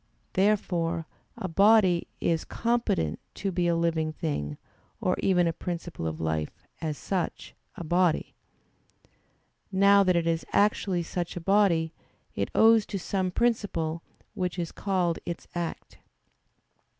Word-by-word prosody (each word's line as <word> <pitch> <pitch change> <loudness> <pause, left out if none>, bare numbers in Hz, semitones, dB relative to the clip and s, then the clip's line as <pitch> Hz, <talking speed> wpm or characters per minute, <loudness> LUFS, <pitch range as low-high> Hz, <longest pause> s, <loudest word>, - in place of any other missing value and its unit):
Therefore 175 -4 +1 0.3
a 190 - -3
body 195 -1 +4
is 165 -2 0
competent 230 - 0 0.2
to 195 - -2
be 175 -1 0
a 170 - +2
living 165 -2 0
thing 145 - -3 0.4
or - - +1
even 180 -2 +3
a 165 - +1
principle 170 - -5
of 80 -1 -4
life, 80 -1 -3 0.2
as 155 -3 -2
"such" 185 -3 -3 0.2
a - - -6
body. 175 0 +1 1.4
Now 200 +1 +6
that 185 -2 +2
it 170 -1 +1
is 165 -1 0
actually 200 -3 +2
such 175 +1 -4
a - - -2
body, 170 -3 +2 0.4
it - - -2
owes 225 -1 +6
to 200 - -3
some 185 +1 -1
principle 180 -7 0 0.3
which 180 -1 -2
is 170 -2 -3
called 180 -4 0
its 170 - -6
act. 170 -1 -5
175 Hz, 135 wpm, -27 LUFS, 165-195 Hz, 1.4 s, Now